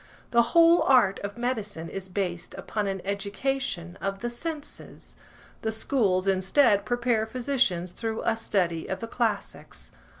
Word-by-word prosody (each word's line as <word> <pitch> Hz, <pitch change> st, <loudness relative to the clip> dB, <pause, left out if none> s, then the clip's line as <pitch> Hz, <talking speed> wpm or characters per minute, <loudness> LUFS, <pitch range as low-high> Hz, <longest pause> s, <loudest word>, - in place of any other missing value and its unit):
The 235 Hz, -, +6 dB, 0.2 s
whole 335 Hz, +1 st, +7 dB
art 245 Hz, -8 st, +4 dB
of 200 Hz, +2 st, -6 dB
medicine 215 Hz, -9 st, -3 dB
is 190 Hz, +2 st, -6 dB
based 180 Hz, -3 st, -3 dB
upon 210 Hz, -2 st, -3 dB
an 195 Hz, -2 st, -3 dB
education 200 Hz, -2 st, -2 dB
of 195 Hz, 0 st, -3 dB
the 240 Hz, 0 st, -2 dB
senses; 300 Hz, +4 st, -6 dB, 0.5 s
the 220 Hz, -, -1 dB
schools, 210 Hz, -5 st, +1 dB
instead, 200 Hz, +3 st, +3 dB
prepare 240 Hz, -2 st, +1 dB
physicians 235 Hz, -8 st, 0 dB
through 225 Hz, +2 st, -3 dB
a 225 Hz, -, +2 dB
study 180 Hz, -7 st, 0 dB
of 190 Hz, -, -3 dB
the 230 Hz, -, -5 dB
classics. 225 Hz, -3 st, -3 dB
210 Hz, 140 wpm, -27 LUFS, 190-245 Hz, 0.5 s, whole